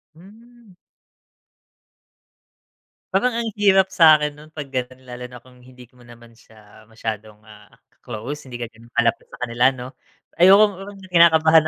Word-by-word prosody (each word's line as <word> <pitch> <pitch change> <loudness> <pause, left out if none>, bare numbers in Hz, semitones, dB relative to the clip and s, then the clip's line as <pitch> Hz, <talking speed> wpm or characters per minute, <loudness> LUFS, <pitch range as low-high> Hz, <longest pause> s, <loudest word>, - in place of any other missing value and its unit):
Hmm. 225 +4 -19 2.4
Parang 230 +5 +1
ang 230 -1 -3
hirap 190 -2 +3
sa'kin 155 -4 +5
nun 155 +1 -15
pag 145 -3 -8
gano'n 130 0 -5
lalo 125 0 -9
na 125 -1 -14
kung 125 -1 -20
hindi 125 0 -16
mo 125 - -25
naman 120 0 -16
siya 110 -1 -20
masyadong 110 -1 -7
ah, 110 -1 -17 0.3
close 135 +7 -8
hindi 125 - -9
ka 120 -1 -6 0.2
malapit 115 -1 0
sa - - -13
kanila 120 +1 +2
ano 130 -2 -3 0.5
ayokong 195 0 +3
kinakabahan 160 -2 +5
135 Hz, 135 wpm, -21 LUFS, 120-185 Hz, 2.4 s, sa'kin